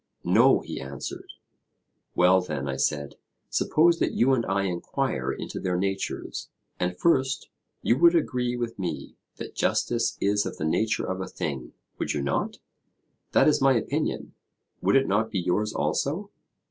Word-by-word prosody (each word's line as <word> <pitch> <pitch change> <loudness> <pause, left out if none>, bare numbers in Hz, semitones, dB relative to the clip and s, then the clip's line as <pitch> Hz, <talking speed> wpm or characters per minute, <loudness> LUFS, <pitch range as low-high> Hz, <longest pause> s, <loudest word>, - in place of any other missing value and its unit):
No, - - +5
he - - -6
answered. 70 +1 -7 0.8
Well 90 +1 +5
then, 75 -6 -4
I 70 - -2
said, 70 +1 -1 0.3
suppose 165 +2 +3
that - - +1
you 130 +3 +3
and 120 -3 +2
I 100 0 +1
enquire 90 -3 -1
into - - -5
their 90 -1 -1
natures. 95 +1 -3 0.3
And 90 0 -1
first, 135 - +1 0.3
you 120 - +2
would 170 +1 +6
agree 125 -6 0
with 120 -3 -4
me 90 -2 -4 0.2
that - - -8
justice - - 0
is 105 +1 +2
of - - -6
the 80 - -2
nature 110 +7 +1
of 95 0 -3
a 95 - -4
thing, 70 -5 -5 0.3
would - - -1
you 70 - -1
not? 70 - -1 0.8
That - - +5
is 150 - +3
my 135 0 +5
opinion: 115 - -2 0.5
would - - +3
it 135 0 +5
not 105 +3 +1
be 105 - -3
yours 105 +5 0
also? 150 - -1
100 Hz, 160 wpm, -26 LUFS, 90-130 Hz, 0.8 s, would